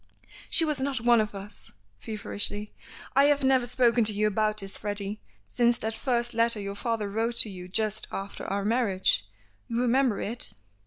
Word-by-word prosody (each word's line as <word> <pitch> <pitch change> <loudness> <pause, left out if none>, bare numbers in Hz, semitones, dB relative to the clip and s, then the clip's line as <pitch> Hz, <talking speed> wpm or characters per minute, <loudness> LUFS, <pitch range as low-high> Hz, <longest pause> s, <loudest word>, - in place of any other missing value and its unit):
"She 330 - +6
was 300 -3 -1
not 265 -1 -1
one 235 0 +4
of 210 -1 -4
us," 200 +1 -8 0.3
feverishly. 210 - -5 0.4
"I 275 - +6
have 285 -1 +2
never 260 -2 +3
spoken 240 -1 +3
to 210 - +1
you 210 +1 0
about 215 0 0
this, 195 -2 +2
Freddy, 205 0 -4 0.2
since 240 -1 +2
that 220 -1 -3
first 240 0 -1
letter 230 -1 +4
your 200 -1 -5
father 220 0 -2
wrote 225 +4 -2
to 215 - -1
you 180 -1 -9
just 215 +3 0
after 195 +1 -6
our 200 +1 -2
marriage. 200 - +2 0.4
You 235 0 -2
remember 250 -2 +2
it? 235 +3 0
220 Hz, 175 wpm, -27 LUFS, 205-240 Hz, 0.4 s, She